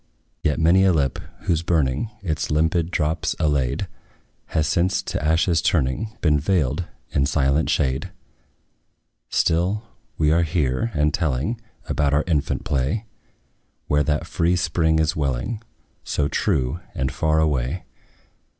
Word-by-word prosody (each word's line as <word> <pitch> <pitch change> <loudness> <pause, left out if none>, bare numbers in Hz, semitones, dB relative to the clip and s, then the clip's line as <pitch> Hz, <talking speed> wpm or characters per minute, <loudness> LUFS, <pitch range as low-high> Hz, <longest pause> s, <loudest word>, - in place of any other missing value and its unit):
Yet 75 - +1
many 85 +4 +5
a 95 -1 +5
lip, 70 -5 0 0.2
whose 80 -2 +1
burning 80 - +1
Its 80 -5 -2
limpid 80 +2 +1
drops 80 0 0
allayed, 70 -6 0 0.6
Has 80 -2 0
since, 85 +4 +1
to - - -3
ashes 80 +2 +2
turning, 90 - 0
Been 75 -3 +3
veiled 80 0 +1 0.3
in 70 0 +2
silent 70 +1 +2
shade. 65 0 0 1.2
Still 90 +6 +1 0.3
we 75 -1 +3
are 85 +2 +4
here, 80 - 0
and 75 0 +2
telling 85 - -1 0.3
About 70 -1 +1
our 75 - +2
infant 80 -5 0
play; 70 - 0 0.8
Where 75 0 +2
that 75 0 0
free 85 +2 +1
spring 80 -2 +1
is 80 0 +1
welling, 75 - -2 0.4
So 70 - 0
true, 65 +2 0 0.2
and 65 -1 -1
far 80 -1 +1
away. 75 +1 0
80 Hz, 130 wpm, -23 LUFS, 70-85 Hz, 1.2 s, many